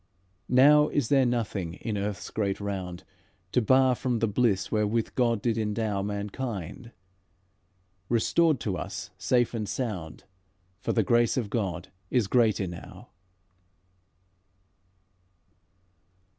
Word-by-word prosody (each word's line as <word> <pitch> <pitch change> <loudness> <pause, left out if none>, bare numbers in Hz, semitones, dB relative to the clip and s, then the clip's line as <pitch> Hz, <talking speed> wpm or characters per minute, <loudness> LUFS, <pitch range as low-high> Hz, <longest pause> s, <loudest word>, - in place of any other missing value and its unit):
Now 150 +4 +6
is 140 -6 0
there 135 -3 +4
nothing 105 -8 -2
in 110 +2 -4
earth's 100 0 -4
great 100 -3 -1
round, 95 -3 -5 0.5
To 125 - +3
bar 130 +3 +4
from 125 -1 -1
the 115 - +1
bliss 105 -2 +1
wherewith 110 +1 +1
God 115 -4 +1
did 115 -2 +1
endow 105 -2 -1
Mankind, 105 +1 -5 1.2
restored 145 +6 +2
to 95 -4 -2
us - - -6
safe 120 -2 +2
and 110 -3 -3
sound, 95 -11 -4 0.6
For - - -2
the 110 - +2
grace 120 +5 +2
of 110 -5 -2
God 100 -8 -2 0.2
is 125 -4 +2
great 110 0 +3
enow." 90 -3 -7
110 Hz, 115 wpm, -27 LUFS, 100-125 Hz, 1.2 s, Now